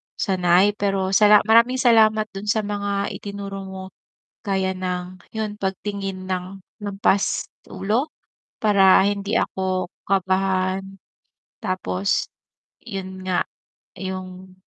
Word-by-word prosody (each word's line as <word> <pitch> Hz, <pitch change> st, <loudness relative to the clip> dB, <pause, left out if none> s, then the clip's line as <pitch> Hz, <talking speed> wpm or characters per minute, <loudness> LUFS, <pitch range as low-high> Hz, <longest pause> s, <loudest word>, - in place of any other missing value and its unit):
sanay, 185 Hz, +1 st, +3 dB
pero 195 Hz, -2 st, 0 dB
sala 210 Hz, +1 st, +6 dB
maraming 230 Hz, +3 st, +5 dB
salamat 220 Hz, -4 st, +4 dB
dun 195 Hz, +2 st, -7 dB
sa 215 Hz, +1 st, +2 dB
mga 200 Hz, -1 st, -2 dB
itinuro 200 Hz, -1 st, -6 dB
mo, 190 Hz, 0 st, -7 dB, 0.6 s
gaya 190 Hz, -2 st, 0 dB
ng 180 Hz, 0 st, -4 dB, 0.2 s
'yun 215 Hz, -2 st, -3 dB
pagtingin 195 Hz, -1 st, -4 dB
ng 185 Hz, +1 st, -4 dB, 0.2 s
lampas 200 Hz, 0 st, +1 dB, 0.2 s
ulo, 235 Hz, +10 st, -1 dB, 0.4 s
Para 195 Hz, -3 st, +5 dB
hindi 200 Hz, +1 st, 0 dB
ako 185 Hz, -1 st, -1 dB, 0.2 s
kabahan, 190 Hz, 0 st, 0 dB, 0.7 s
tapos 185 Hz, -1 st, -1 dB, 0.6 s
'yun 190 Hz, -4 st, -7 dB
nga, 180 Hz, -, +1 dB, 0.5 s
'yung, 185 Hz, 0 st, -7 dB
195 Hz, 100 wpm, -22 LUFS, 185-205 Hz, 0.7 s, sala